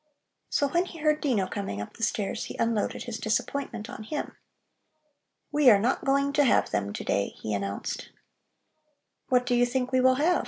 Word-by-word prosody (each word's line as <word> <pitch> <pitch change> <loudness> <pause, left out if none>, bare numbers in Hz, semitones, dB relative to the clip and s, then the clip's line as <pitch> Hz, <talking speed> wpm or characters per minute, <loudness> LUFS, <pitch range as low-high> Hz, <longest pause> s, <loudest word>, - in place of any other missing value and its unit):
So 285 - +2
when 345 +5 +2
he 345 - -10
heard 305 -1 +1
Dino 235 -10 +1
coming 195 - -4
up 105 - -6
the - - -14
stairs, 210 -3 -1
he - - -8
unloaded 230 -2 0
his 230 -2 -5
disappointment 225 0 -2
on 250 -1 -8
him. 290 +8 -4 1.2
"We 295 -3 +6
are 210 - +8
not 230 +6 0
going 280 +1 +2
to 295 0 +4
have 255 - +3
them 100 -1 -1
to - - -5
day," 100 - +1
he 110 - -3
announced. 100 0 -3 1.2
"What 250 -1 +3
do 245 - 0
you 245 0 +4
think 250 +1 0
we 260 -1 +3
will 260 0 +5
have? 330 +6 +3
245 Hz, 190 wpm, -27 LUFS, 210-280 Hz, 1.2 s, are